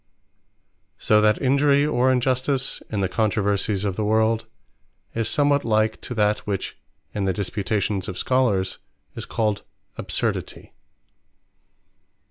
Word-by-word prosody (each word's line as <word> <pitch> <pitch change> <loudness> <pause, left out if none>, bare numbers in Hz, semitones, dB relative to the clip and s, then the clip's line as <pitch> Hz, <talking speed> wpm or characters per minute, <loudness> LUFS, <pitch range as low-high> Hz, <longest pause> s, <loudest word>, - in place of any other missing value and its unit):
So 105 0 +3
that 105 0 +3
Injury, 140 +2 +3
or 130 -3 +2
Injustice, 130 +1 0
in 105 -2 -2
the 95 - +1
controversies 105 -1 0
of 95 -2 -2
the 110 - 0
world, 110 +1 +1 0.7
is 115 -1 -1
somewhat 145 -1 +2
like 110 -1 +1
to 125 - -6
that, 105 -1 +2
which 100 -2 -3 0.4
in 100 -2 -1
the 95 - +1
disputations 100 0 -2
of 90 - -5
Scholers 115 -8 +1 0.3
is - - -7
called 105 -2 -1 0.4
Absurdity. - - -3
110 Hz, 120 wpm, -23 LUFS, 100-130 Hz, 0.7 s, So